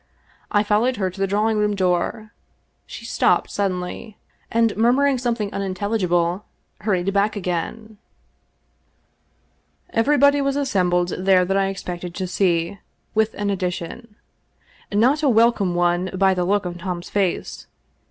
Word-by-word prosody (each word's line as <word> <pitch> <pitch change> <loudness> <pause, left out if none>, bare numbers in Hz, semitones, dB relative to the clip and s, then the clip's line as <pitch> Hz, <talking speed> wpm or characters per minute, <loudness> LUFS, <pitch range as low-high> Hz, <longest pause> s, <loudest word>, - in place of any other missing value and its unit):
I 205 -2 +2
followed 215 +5 +1
her 190 -2 -1
to 190 - -13
the 195 - +2
drawing 210 +2 +1
room 210 0 +1
door. 185 +3 -1 0.6
She - - -9
stopped - - +1
suddenly, 195 +2 -3 0.3
and 230 -1 +2
murmur 245 +6 +3
ing 275 -3 +2
something 230 -4 -2
unintelligible 190 -2 -1 0.4
hurried 195 -2 0
back 205 +2 +1
again. 205 +4 -4 1.9
Everybody 285 +4 +3
was 275 0 0
assembled 180 -10 +1
there 185 -1 +4
that 195 +2 -1
I 195 0 +2
expected 180 -2 -6
to 190 - -3
see, 180 0 0 0.3
with 220 0 +1
an 205 0 -1
addition. 190 +4 -4 0.8
Not 250 +9 +3
a 290 - +3
welcome 225 -6 +3
one 175 +1 +1
by 190 0 +3
the 180 -1 -1
look 200 +1 +1
on 175 0 -5
Tom's 175 -1 -5
face. 195 -3 -2
200 Hz, 135 wpm, -22 LUFS, 180-220 Hz, 1.9 s, there